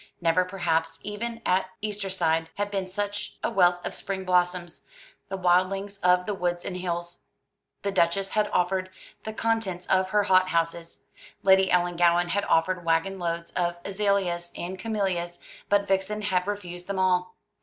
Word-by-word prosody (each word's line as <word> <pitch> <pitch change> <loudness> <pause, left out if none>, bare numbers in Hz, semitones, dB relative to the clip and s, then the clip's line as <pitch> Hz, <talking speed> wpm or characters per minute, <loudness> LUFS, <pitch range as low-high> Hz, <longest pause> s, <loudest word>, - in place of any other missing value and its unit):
Never, 170 +1 +3
perhaps, 165 -3 -1
even 230 +3 -4
at 185 +1 +2
Eastertide, 185 -6 0
had 205 0 -2
been 195 -2 -2
seen 185 - -15
such 205 0 -3
a - - 0
wealth 175 0 +3
of - - -3
spring 190 -1 -4
blossoms, 180 -1 0 0.4
the 195 - -3
wildlings 190 +2 +1
of 180 0 +3
the 210 - -1
woods 175 -2 -2
and 180 - -4
hills. 175 -1 -4 0.6
The 200 - 0
Duchess 190 +2 +1
had 210 -1 +1
offered 185 +1 +1 0.4
the 220 - -3
contents 220 -6 -1
of 185 0 +2
her 210 +1 +3
hot 185 -2 +4
houses, 165 0 -2 0.4
Lady 190 0 +5
Ellangowan 175 0 +3
had 200 +3 0
offered 180 +2 +2
waggon 165 +4 +1
loads 170 -1 -3
of 175 -1 -1
azaleas 195 -4 0
and 185 +2 -5
camellias, 185 -5 -2 0.3
but 200 0 +3
Vixen 195 +2 0
had 185 -2 0
refused 180 -3 -5
them 200 -1 -3
all. 180 -1 +1
185 Hz, 160 wpm, -26 LUFS, 175-195 Hz, 0.6 s, Lady